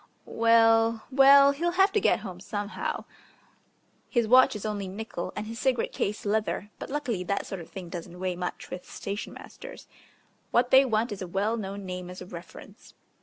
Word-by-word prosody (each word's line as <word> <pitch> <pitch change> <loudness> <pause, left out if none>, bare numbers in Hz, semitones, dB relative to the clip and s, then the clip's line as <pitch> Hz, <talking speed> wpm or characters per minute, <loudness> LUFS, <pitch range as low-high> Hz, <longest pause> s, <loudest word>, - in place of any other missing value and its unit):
Well, 225 0 +4
well, 275 +1 +7
he'll 340 +5 -1
have 385 +2 +4
to 420 - +1
get - - +2
home 185 -4 -8
somehow. 205 +2 -4 1.0
His 235 -4 +1
watch 255 +1 +6
is 210 - -6
only 205 -2 -3
nickel 195 -2 -5
and 210 - -4
his 225 +2 -7
cigarette 255 -3 0
case 210 +2 -3
leather, 205 -1 -1
but - - -7
luckily 260 -10 -2
that 200 +3 -1
sort 195 -3 -6
of 165 - -12
thing 185 -3 -8
doesn't 175 +1 -8
weigh 185 -1 -2
much 180 0 -5
with 180 - -7
station 200 +2 -5
masters. - - -11 0.6
What 245 +1 +2
they 265 +1 +7
want 225 -1 0
is 205 - -6
a 185 - -4
well 200 +5 0
known 200 -2 -5
name 180 -1 -6
as 180 - -9
a - - -8
reference. 180 +4 -12
210 Hz, 185 wpm, -27 LUFS, 185-240 Hz, 1.0 s, well